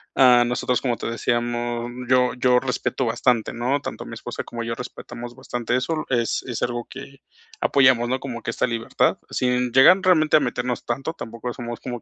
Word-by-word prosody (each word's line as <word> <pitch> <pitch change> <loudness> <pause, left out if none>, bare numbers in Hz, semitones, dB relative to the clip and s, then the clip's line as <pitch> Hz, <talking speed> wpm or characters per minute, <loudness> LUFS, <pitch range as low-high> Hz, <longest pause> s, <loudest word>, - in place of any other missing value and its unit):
Ah, 125 -2 +6
nosotros, 125 +1 0
como 120 -3 -1
te - - -5
decíamos, 120 0 -1 0.2
yo 125 -1 +4
yo 125 0 +3
respeto 130 0 -2
bastante, 115 0 +1
¿no? 125 +4 0
Tanto - - -6
mi - - -9
esposa - - -6
como 115 0 -6
yo 115 0 -3
respetamos 120 0 -8
bastante 120 -2 -3
eso, 155 +5 -1
es 120 -3 0
es 120 -3 -4
algo 120 -1 -2
que 135 0 -11 0.4
apoyamos, 130 -3 +4
¿no? 130 - 0
Como 125 -4 -6
que 115 - -5
esta - - 0
libertad. 115 -1 0
Sin 125 -1 0
llegar 135 +9 +7
realmente 155 -5 +4
a - - +4
meternos 125 -2 -2
tanto, 135 +7 -3
tampoco 115 -4 -6
somos 120 -1 -6
como 120 -2 -6
125 Hz, 185 wpm, -23 LUFS, 120-130 Hz, 0.4 s, llegar